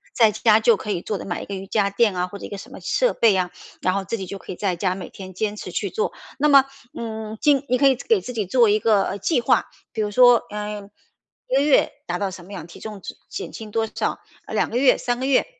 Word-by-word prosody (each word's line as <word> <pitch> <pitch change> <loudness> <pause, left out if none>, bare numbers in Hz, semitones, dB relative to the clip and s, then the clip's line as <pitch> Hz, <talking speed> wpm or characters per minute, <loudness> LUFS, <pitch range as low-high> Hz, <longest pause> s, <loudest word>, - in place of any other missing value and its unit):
在 225 -3 +5
家 215 0 +4
就 225 +1 +5
可 210 - -7
以 180 -4 -2
做 210 - -2
的， - - -7
买 175 - -4
一 - - -8
个 200 - -7
瑜 190 0 -7
伽 200 -1 +1
垫 205 -1 +2
啊， 180 0 0
或 200 +2 -9
者 - - -7
一 - - -8
个 200 - -6
什 200 - -11
么 - - -9
设 - - +1
备 225 -2 +4
呀， 185 -2 0 0.3
然 185 - +1
后 200 0 -1
自 215 +5 -3
己 190 - -5
就 195 +2 -6
可 - - -9
以 - - -5
在 190 -1 -1
家 185 +1 -1
每 190 - -7
天 190 -1 -10
坚 210 +2 -1
持 - - -7
去 - - -2
做。 445 +1 -1 0.3
那 300 - +3
么， 275 -2 +7 0.3
嗯， 220 -1 -5
今 285 -2 +3
你 255 - +3
可 275 - +5
以 265 - +4
给 425 - +1
自 250 - -7
己 215 -3 -1
做 235 +2 +4
一 210 +1 +3
个 205 -2 +2
计 275 - +1
划， 235 - +2 0.2
比 220 - -2
如 210 - 0
说， 245 +1 +6
呃， 210 -1 -5 0.6
1 255 - 0
个 275 - +4
月 290 0 +4 0.2
达 - - -1
到 200 -2 -2
什 180 -2 -10
么 200 - -11
样， 180 -5 -7
体 - - -13
重 210 -3 -8
值 - - -7
减 - - -6
轻 220 -1 -8
多 225 +1 +1
少， - - -3 0.3
2 - - 0
个 235 - 0
月 260 +1 +5
3、 245 -1 -2
个 260 - -2
月。 275 - +3
215 Hz, 290 characters per minute, -23 LUFS, 195-245 Hz, 0.6 s, 么